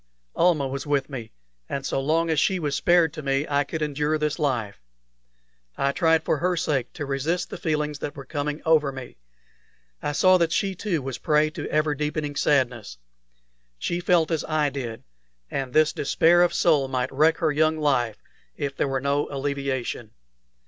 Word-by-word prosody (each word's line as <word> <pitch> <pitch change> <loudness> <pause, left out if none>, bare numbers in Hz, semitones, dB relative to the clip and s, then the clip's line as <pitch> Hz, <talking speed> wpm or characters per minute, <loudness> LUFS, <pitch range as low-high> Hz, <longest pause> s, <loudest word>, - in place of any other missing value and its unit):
Almah 165 -6 +3
was 135 +1 -5
with 145 -1 0
me, 120 -5 -6 0.4
and 135 -1 -3
so - - -1
long 165 +4 +1
as 155 - +2
she 190 +5 +2
was 150 -5 -2
spared 170 -3 +3
to - - -6
me 140 +1 0
I 145 0 +2
could 155 +2 -4
endure 150 +1 0
this 150 +1 -2
life. 120 - -1 1.0
I 140 - +1
tried 160 +1 +2
for 155 - +1
her 180 0 0
sake 145 -7 -1
to 145 - -5
resist 160 +6 -2
the - - -5
feelings 150 -3 -1
that 145 - -5
were 140 -2 -9
coming 145 +1 -3
over 155 -3 +3
me. 130 - -9 0.8
I 145 - -2
saw 185 +4 +5
that 165 -1 +1
she 195 +1 0
too 180 -6 -2
was 135 -1 -4
a - - -28
prey 155 0 +2
to - - -6
ever 155 0 +1
deepening 150 0 -3
sadness. 125 - 0 0.8
She 170 - -2
felt 175 -2 +2
as 160 - 0
I 155 -2 +1
did, 120 -5 -6 0.5
and 135 -2 -3
this 155 +2 +3
despair 170 +4 +3
of 175 -1 +4
soul 150 -6 +3
might 130 -1 -2
wreck 155 +4 +3
her 160 -4 +1
young 155 +1 +2
life 130 -7 0 0.3
if 140 -1 -3
there - - 0
were 135 -1 -1
no 140 +1 0
alleviation. 135 -5 -3
150 Hz, 185 wpm, -25 LUFS, 135-160 Hz, 1.0 s, saw